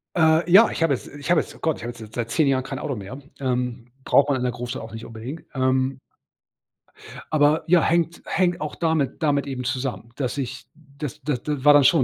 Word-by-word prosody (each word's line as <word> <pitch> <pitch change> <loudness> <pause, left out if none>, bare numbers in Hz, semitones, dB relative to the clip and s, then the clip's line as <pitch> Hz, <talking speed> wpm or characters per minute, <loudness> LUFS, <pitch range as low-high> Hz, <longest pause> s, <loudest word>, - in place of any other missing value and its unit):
Äh, 160 0 +3
ja, 210 +5 +8
ich - - -5
habe 160 -4 +3
jetzt 130 - -4
ich 145 +2 -8
habe 175 -2 +5
jetzt - - -11
oh - - -16
Gott, 160 -2 0
ich - - -10
habe 120 - -4
jetzt 120 - -14
jetzt 110 -1 -11
seit 115 -1 -3
10 150 +3 +3
Jahren 130 -1 +2
kein 135 0 -5
Auto 140 - -3
mehr. 105 +6 -8 0.2
Ähm, 125 -2 -2
braucht 140 +2 +4
man 140 - +2
in 125 - -3
der 125 - +1
Großstadt 125 +1 -5
auch 115 0 -9
nicht 110 0 -7
unbedingt, 120 +8 -8
ähm 130 0 +1 1.3
aber 150 0 +3
ja, 170 0 +5
hängt 170 +1 +1
hängt 180 -2 0
auch 150 -1 -4
damit 160 -5 0
damit 145 -3 +1
eben 130 -2 -4
zusammen, 125 -4 -3
dass 135 -1 -3
ich 130 -2 -4
das 145 -2 -8
d 150 -2 -1
d 145 +2 -4
war 145 - +9
dann 145 -1 +6
schon 130 - +5
135 Hz, 235 wpm, -23 LUFS, 125-155 Hz, 1.3 s, war